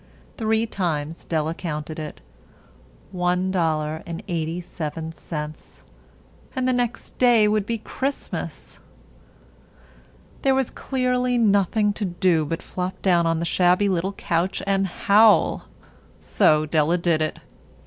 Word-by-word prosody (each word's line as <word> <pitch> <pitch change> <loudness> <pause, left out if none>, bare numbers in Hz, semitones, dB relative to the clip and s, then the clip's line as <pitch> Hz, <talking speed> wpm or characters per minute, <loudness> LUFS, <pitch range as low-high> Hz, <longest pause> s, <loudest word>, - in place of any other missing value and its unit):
Three 220 0 +1
times 165 -7 -3
Della 160 -1 -1
counted 155 -2 -5
it. 155 - -7 0.9
One 180 0 0
dollar 160 -3 0
and 170 -1 -6
eighty 165 0 -2
seven 160 -2 -5
cents. 155 -1 -8 0.7
And 260 -1 0
the 255 - +2
next 245 -1 -3
day 240 -4 +5
would 210 -1 +1
be 230 - -1
Christmas. 265 +5 -5 1.6
There 270 -1 +3
was 265 -2 0
clearly 250 -1 0
nothing 205 -1 +3
to 210 0 -3
do 175 -3 +1
but 165 +3 -4
flop 185 0 -4
down 175 -3 +3
on 165 0 +1
the 170 - -2
shabby 180 +3 +3
little 190 +1 -1
couch 175 0 -1
and 195 -1 +1
howl. 210 +4 +4 0.5
So 155 0 +3
Della 155 +3 +2
did 170 -2 +1
it. 155 - -2
180 Hz, 130 wpm, -23 LUFS, 160-215 Hz, 1.6 s, day